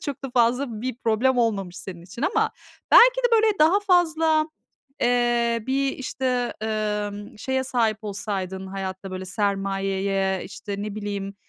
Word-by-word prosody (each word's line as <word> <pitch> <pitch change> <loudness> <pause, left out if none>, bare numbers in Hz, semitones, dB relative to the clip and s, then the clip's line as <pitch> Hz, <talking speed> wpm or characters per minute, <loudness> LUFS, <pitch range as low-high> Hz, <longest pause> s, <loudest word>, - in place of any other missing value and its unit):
çok 285 -2 -5
da 265 - -4
fazla 240 -1 +1
bir 255 -2 -3
problem 245 +3 +2
olmamış 195 -6 0
senin 185 -3 -8
için 190 +8 -9
ama - - +2 0.4
belki - - +8
de, - - +8
böyle, 445 0 +5
daha 335 +7 +5
fazla, 325 -5 +3 0.5
eee, 240 -2 +2
bir, 270 +1 +1
işte, 255 -2 -2
emm, 210 -1 -3
şeye 265 +3 -1
sahip 225 -4 +1
olsaydın 195 -2 -4
hayatta, 190 0 -5
böyle, 185 0 -5
sermayeye, 195 -1 -1
işte, 200 -1 -6
ne 210 -1 -5
bileyim, 200 -1 -4
220 Hz, 140 wpm, -24 LUFS, 195-260 Hz, 0.5 s, belki